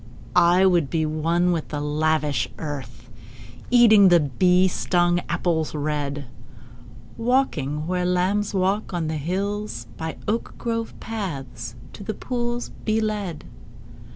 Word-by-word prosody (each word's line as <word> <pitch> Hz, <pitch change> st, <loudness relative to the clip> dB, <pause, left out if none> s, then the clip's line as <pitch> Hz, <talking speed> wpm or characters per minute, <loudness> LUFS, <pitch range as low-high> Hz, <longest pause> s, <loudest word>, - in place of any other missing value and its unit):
I 180 Hz, +2 st, +5 dB
would 175 Hz, -7 st, +3 dB
be 160 Hz, -2 st, 0 dB
one 165 Hz, +3 st, +1 dB
with 165 Hz, -3 st, -1 dB
the 150 Hz, -, -4 dB
lavish 150 Hz, -4 st, 0 dB
earth, 130 Hz, -6 st, -7 dB, 0.6 s
Eating 220 Hz, -5 st, +7 dB
the 175 Hz, -2 st, +6 dB
bee 180 Hz, +6 st, +3 dB
stung 175 Hz, -1 st, +1 dB
apples 160 Hz, -3 st, 0 dB
red: 145 Hz, -1 st, -2 dB, 0.9 s
Walking 160 Hz, -, 0 dB
where 180 Hz, +1 st, -1 dB
lambs 185 Hz, +3 st, +1 dB
walk 195 Hz, 0 st, 0 dB
on 170 Hz, -2 st, -1 dB
the 160 Hz, -, -2 dB
hills; 200 Hz, +7 st, -3 dB
By 160 Hz, 0 st, -5 dB
oak 225 Hz, +3 st, -2 dB
grove 230 Hz, -1 st, -3 dB
paths 165 Hz, -, -5 dB, 0.2 s
to 205 Hz, -, -9 dB
the 215 Hz, -, -4 dB
pools 240 Hz, -1 st, -3 dB
be 220 Hz, 0 st, +1 dB
led. 210 Hz, -7 st, -3 dB
175 Hz, 125 wpm, -23 LUFS, 155-205 Hz, 0.9 s, Eating